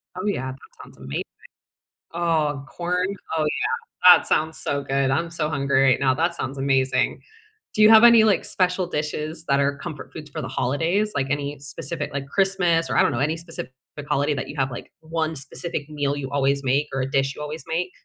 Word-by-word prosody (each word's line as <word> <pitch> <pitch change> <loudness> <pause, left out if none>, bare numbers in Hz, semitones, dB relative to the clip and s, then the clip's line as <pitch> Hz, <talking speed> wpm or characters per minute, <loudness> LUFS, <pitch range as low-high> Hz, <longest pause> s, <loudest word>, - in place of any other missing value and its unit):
Oh - - -5
yeah, 130 -11 -1
that 130 - -11 0.2
sounds - - -16
amazing 65 +1 -4 0.9
oh, 155 -5 0
corn? 180 +6 -1 0.3
Oh 155 - +1 0.4
yeah, 180 - +6
that - - -8
sounds 160 +1 +1
so 140 0 -2
good, 135 -1 0
I'm 165 +5 0
so 165 -2 -2
hungry 140 -2 +1
right 130 -2 +4
now, 130 -2 +3
that 165 +4 +1
sounds 135 +2 -4
amazing. 135 -1 +1 0.5
Do 215 - +2
you 215 - +8
have 220 +1 +8
any, 235 -2 +8
like, 215 -2 +2
special 180 -1 0
dishes 155 0 -3
that 140 0 +3
are 140 0 +1
comfort 155 -1 -8
foods 155 -2 -9
for - - -5
the - - -5
holidays, 165 +11 0
like 135 -1 0
any 145 0 -2
specific, 150 +2 -5
like, 140 -1 -3
Christmas, 180 -2 +1
or - - 0
I - - +6
don't - - +2
know 120 - -2
any 150 +4 +1
specific, 165 -4 -8 0.2
like, 145 -1 -7
holiday 145 +1 +1
that 135 - -4
you 145 - -8
have, 135 -1 0
like, 120 - -8
1 160 0 -2
specific 150 +1 -5
meal 145 -2 -1
you 140 -1 -5
always 140 0 +1
make, 140 +3 +1
or 135 - -1
a 130 - -2
dish 135 0 0
you - - -9
always 150 0 -6
make? 175 +3 -2
150 Hz, 215 wpm, -23 LUFS, 140-170 Hz, 0.9 s, you